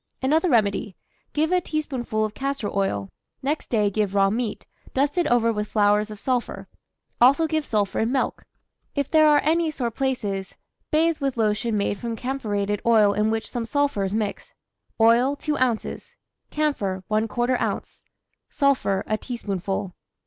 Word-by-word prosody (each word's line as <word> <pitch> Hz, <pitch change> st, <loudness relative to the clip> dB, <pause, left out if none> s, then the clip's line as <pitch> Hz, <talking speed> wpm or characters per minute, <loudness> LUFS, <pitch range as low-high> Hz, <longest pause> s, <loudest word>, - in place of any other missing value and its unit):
Another 315 Hz, +6 st, +3 dB
remedy: 210 Hz, -, +1 dB, 0.4 s
give 315 Hz, +3 st, 0 dB
a 365 Hz, 0 st, +3 dB
teaspoonful 260 Hz, -9 st, -2 dB
of 215 Hz, -, -5 dB
castor 275 Hz, -5 st, -3 dB
oil; 100 Hz, -, -1 dB, 0.3 s
next 295 Hz, +3 st, -1 dB
day 210 Hz, -3 st, +2 dB
give 205 Hz, -1 st, -1 dB
raw 195 Hz, 0 st, +4 dB
meat, 225 Hz, -1 st, -3 dB, 0.3 s
dusted 290 Hz, +5 st, +1 dB
over 230 Hz, -1 st, +3 dB
with 210 Hz, 0 st, -2 dB
flowers 210 Hz, 0 st, +2 dB
of 210 Hz, -1 st, -8 dB
sulphur. 250 Hz, +1 st, -2 dB, 0.5 s
Also 280 Hz, +6 st, +6 dB
give 315 Hz, -1 st, 0 dB
sulphur 210 Hz, -6 st, -1 dB
in 225 Hz, +2 st, +1 dB
milk. 270 Hz, -, -1 dB, 0.5 s
If 280 Hz, -2 st, -1 dB
there 310 Hz, -1 st, +6 dB
are 295 Hz, -1 st, +5 dB
any 325 Hz, +2 st, +2 dB
sore 250 Hz, -6 st, -2 dB
places, 215 Hz, -8 st, -2 dB, 0.3 s
bathe 320 Hz, 0 st, +2 dB
with 275 Hz, -3 st, -2 dB
lotion 215 Hz, 0 st, +1 dB
made 200 Hz, 0 st, -1 dB
from 235 Hz, -1 st, -3 dB
camphorated 210 Hz, -6 st, -2 dB
oil 215 Hz, -3 st, +5 dB
in 210 Hz, +1 st, +1 dB
which 220 Hz, 0 st, -2 dB
some 240 Hz, -, -3 dB
sulphur 285 Hz, -5 st, 0 dB
is 195 Hz, +1 st, -2 dB
mixed. 215 Hz, -2 st, -3 dB, 0.4 s
Oil, 235 Hz, +5 st, +4 dB
2 295 Hz, 0 st, -2 dB
oz.; 245 Hz, -4 st, -2 dB, 0.3 s
camphor, 205 Hz, -12 st, -1 dB
¼ 240 Hz, +3 st, +1 dB
oz.; -, -, -3 dB, 0.5 s
sulphur, 270 Hz, -9 st, +1 dB
a 215 Hz, 0 st, -1 dB
teaspoonful. 195 Hz, -5 st, -4 dB
230 Hz, 155 wpm, -24 LUFS, 210-280 Hz, 0.5 s, Also